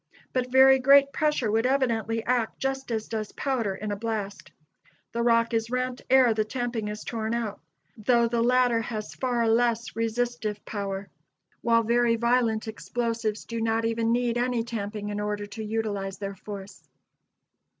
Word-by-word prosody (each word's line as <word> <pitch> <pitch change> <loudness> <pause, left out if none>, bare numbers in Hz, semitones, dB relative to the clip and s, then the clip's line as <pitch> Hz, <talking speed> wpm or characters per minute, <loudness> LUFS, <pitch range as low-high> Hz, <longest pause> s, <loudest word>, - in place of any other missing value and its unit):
But 250 -1 -1
very 265 0 +7
great 275 +1 +6
pressure 300 -8 +1
would 225 +3 +2
evidently 230 -4 0
act 240 -2 0
just 270 0 -2
as 220 -2 -2
does 215 -2 -4
powder 235 -8 -1
in 210 +1 -4
a - - -1
blast: 205 -2 -4 0.6
the 235 - -2
rock 230 0 +3
is 225 0 0
rent 250 0 -2
ere 255 -3 +6
the 215 0 +1
tamping 235 -1 -3
is 210 0 -5
torn 225 0 -2
out, 220 -4 -3 0.4
though 235 +2 +3
the 230 0 0
latter 245 -1 +3
has 220 -2 -5
far 240 -3 0
less 230 0 +1
resistive 225 -2 -2
power; 200 -1 -4 0.5
while 230 -1 +3
very 235 +1 +3
violent 235 -1 +1
explosives 225 -1 -3
do 230 -1 -4
not 225 0 +1
even 230 0 0
need 240 0 +1
any 245 -1 0
tamping 210 -2 -4
in 205 0 -3
order 210 0 -2
to 210 +2 -7
utilize 210 -3 -3
their 200 0 -5
force. 200 0 -9
230 Hz, 160 wpm, -26 LUFS, 215-245 Hz, 0.6 s, very